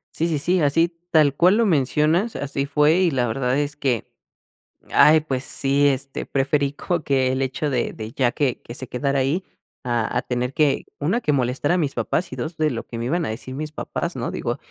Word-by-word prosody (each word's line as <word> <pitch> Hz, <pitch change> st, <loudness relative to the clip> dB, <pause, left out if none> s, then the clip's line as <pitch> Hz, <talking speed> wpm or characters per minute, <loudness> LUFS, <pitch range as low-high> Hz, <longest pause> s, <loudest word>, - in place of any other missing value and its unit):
Sí, 165 Hz, -, 0 dB
sí, 160 Hz, -3 st, 0 dB
sí, 175 Hz, +4 st, +1 dB
así 165 Hz, +4 st, +2 dB
tal 150 Hz, -4 st, +4 dB
cual 180 Hz, +6 st, +4 dB
lo 230 Hz, -, +3 dB
mencionas, 160 Hz, -, +2 dB
así 140 Hz, 0 st, -3 dB
fue 150 Hz, +3 st, +3 dB
y 180 Hz, -2 st, +3 dB
la 130 Hz, -4 st, 0 dB
verdad 125 Hz, +3 st, 0 dB
es 145 Hz, 0 st, -1 dB
que, 130 Hz, -6 st, -1 dB, 0.8 s
ay, 155 Hz, +1 st, +7 dB
pues 135 Hz, -3 st, -3 dB
sí, 140 Hz, +1 st, +2 dB
este, 135 Hz, 0 st, -3 dB
preferí 140 Hz, +1 st, 0 dB
como 170 Hz, +2 st, -2 dB
que 130 Hz, -2 st, +1 dB
el 130 Hz, +1 st, 0 dB
hecho, 135 Hz, +3 st, -2 dB
de 125 Hz, -4 st, -1 dB
de 110 Hz, 0 st, -7 dB
ya 125 Hz, -3 st, +2 dB
que 135 Hz, -5 st, -1 dB
que 120 Hz, -, -9 dB
se 130 Hz, -1 st, -6 dB
quedara 140 Hz, +3 st, -1 dB
ahí 145 Hz, +8 st, 0 dB, 0.4 s
a 120 Hz, -3 st, -1 dB
a -, -, 0 dB
tener 125 Hz, +1 st, -2 dB
que, 150 Hz, -3 st, +2 dB
1 185 Hz, +12 st, 0 dB
que 150 Hz, -, +1 dB
molestar 130 Hz, +3 st, 0 dB
a 180 Hz, -, +3 dB
mis 150 Hz, -5 st, -1 dB
papás 175 Hz, +1 st, -1 dB
y -, -, -4 dB
2 160 Hz, +1 st, -5 dB
de 155 Hz, -1 st, +1 dB
lo 115 Hz, -, -4 dB
que 115 Hz, -, -7 dB
me 115 Hz, -, -3 dB
iban 165 Hz, +5 st, 0 dB
a -, -, -3 dB
decir 130 Hz, +4 st, -6 dB
mis 150 Hz, +2 st, -5 dB
papás, -, -, -4 dB
¿no? -, -, -3 dB
Digo, -, -, -3 dB
140 Hz, 225 wpm, -22 LUFS, 130-155 Hz, 0.8 s, ay